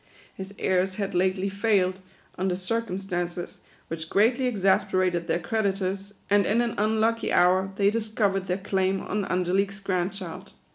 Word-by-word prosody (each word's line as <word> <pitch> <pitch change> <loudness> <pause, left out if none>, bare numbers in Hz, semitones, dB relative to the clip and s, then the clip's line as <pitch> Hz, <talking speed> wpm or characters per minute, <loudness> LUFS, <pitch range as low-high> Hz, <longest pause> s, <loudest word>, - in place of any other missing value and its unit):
His 190 0 -8
heirs 185 0 +1
had 200 -1 -3
lately 185 +2 +1
failed, 195 -2 +1 0.4
under 185 0 0
circumstances 185 -3 -3 0.3
which 160 0 -6
greatly 240 +6 +3
exasperated 185 -5 +1
their - - +1
cre 180 +6 -3
ditors; 195 0 -2
and 200 -2 +3
in 220 +3 +2
an 235 -1 -1
unlucky 220 +2 +1
hour, 185 +2 +3
they 200 0 +3
discovered 210 -3 0
their 180 +1 0
claim 190 -1 0
on 205 -1 -2
Angelique's 190 +3 0
grand 185 -1 -1
child. 190 -4 -8
195 Hz, 145 wpm, -26 LUFS, 185-205 Hz, 0.4 s, greatly